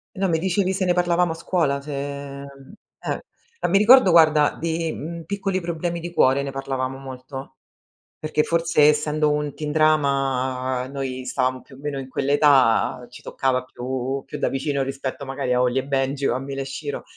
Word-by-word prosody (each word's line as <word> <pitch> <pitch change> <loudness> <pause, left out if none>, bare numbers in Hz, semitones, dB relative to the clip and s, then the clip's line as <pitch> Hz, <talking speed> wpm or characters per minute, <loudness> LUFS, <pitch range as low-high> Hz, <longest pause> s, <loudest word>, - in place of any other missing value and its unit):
E - - -9
no, 195 - +2
mi 160 -2 +1
dicevi 190 +1 0
se 190 - -1
ne 180 - +2
parlavamo 175 -1 +2
a - - -4
scuola, 160 -5 0
se 150 +1 -8 0.5
mhmm, 140 +3 -13 0.3
eh. 465 -1 -6
Mi 195 - +4
ricordo, 215 -1 +7
guarda, 155 -3 +5
di, 165 0 -1
mhmm, 165 +2 -6
Piccoli 195 -1 -2
problemi 170 0 -3
di 175 +1 -6
cuore, 135 -4 +3
ne 140 - -4
parlavamo 135 -1 -3
molto, 135 0 -9 0.7
perché 155 0 0
forse 165 -2 +2
essendo 150 0 +2
un 150 -1 -1
teen 150 -2 -4
drama 135 -4 +1
noi 130 -2 -4
stavamo 130 0 -1
più 135 - -17
o - - -15
meno 145 -1 -4
in 130 - -6
quell'età, 135 -3 +3
ci - - -13
toccava 130 -1 -1
più 130 +1 -4
più - - -7
da - - +1
vicino 140 +1 -1
rispetto 135 +1 -5
magari 130 -1 -2
a 125 - +2
Holly& 125 +1 +1
Benji 135 0 -1
o - - +1
a - - -2
Mila 135 +1 -5
e - - -2
Shiro. 140 +1 -5
140 Hz, 185 wpm, -23 LUFS, 130-165 Hz, 0.7 s, ricordo